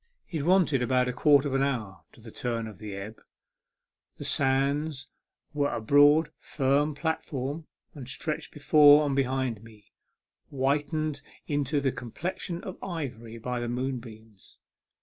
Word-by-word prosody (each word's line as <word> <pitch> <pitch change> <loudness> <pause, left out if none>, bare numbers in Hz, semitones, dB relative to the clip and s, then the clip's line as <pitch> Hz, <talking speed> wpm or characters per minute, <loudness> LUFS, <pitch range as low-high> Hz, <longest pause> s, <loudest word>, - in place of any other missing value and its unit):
It 160 -4 -2
wanted 170 -5 +3
about 125 +1 +2
a 125 - -2
quarter 145 +2 +4
of 135 - -3
an 135 - +2
hour 110 - -2
to - - -18
the 110 0 -11
turn 115 -1 -3
of 110 -3 -10
the 105 -2 -7
ebb. 100 +3 -8 1.0
The - - -7
sands 140 +1 +1 0.4
were 145 -1 0
a - - -2
broad, 145 +6 +5
firm 145 +1 0
platform, 150 -1 -3 0.3
and 130 -4 -9
stretched 155 +3 -4
before 150 0 +6
and 140 -2 0
behind 130 -4 -1
me, 110 -3 -17 0.6
whitened 145 +2 -1 0.2
into 145 0 0
the 135 -1 0
complexion 175 - -5
of 190 - -8
ivory 120 -10 -6
by 125 +2 -3
the 120 0 -3
moonbeams. 115 -5 -6
135 Hz, 145 wpm, -28 LUFS, 120-150 Hz, 1.0 s, before